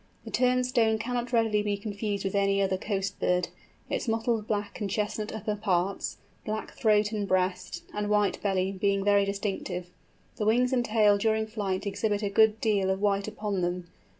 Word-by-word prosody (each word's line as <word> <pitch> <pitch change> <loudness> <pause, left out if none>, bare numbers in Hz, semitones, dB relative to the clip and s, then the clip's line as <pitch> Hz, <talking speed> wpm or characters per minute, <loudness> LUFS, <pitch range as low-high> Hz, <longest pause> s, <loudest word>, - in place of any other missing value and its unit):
The - - -7
Turnstone 250 -3 +2
cannot 240 +1 -2
readily 225 -3 +2
be 205 -1 -1
confused 205 -1 -3
with 195 - -1
any 200 0 +2
other 195 -1 +2
coast 195 0 -3
bird, 180 -1 +1 0.4
its - - -2
mottled 225 -1 0
black 205 0 -3
and 205 - -1
chestnut 210 +1 -2
upper 215 -1 -3
parts, 195 -2 -1 0.3
black 215 0 -4
throat 210 -1 +2
and 210 -2 -2
breast, 185 -1 -1
and 210 0 -2
white 210 -1 +2
belly, 190 -1 0
being 195 0 0
very 200 -1 +4
distinctive. 195 -3 -3 0.5
The 210 - -1
wings 250 +3 +3
and 245 -2 +2
tail 210 -3 +4
during 220 +1 +1
flight 205 -3 -3
exhibit 205 +1 -1
a 205 - 0
good 220 +2 +4
deal 200 -4 +1
of 190 0 0
white 200 0 +1
upon 210 -3 -3
them. 175 0 -2
205 Hz, 180 wpm, -28 LUFS, 195-220 Hz, 0.5 s, very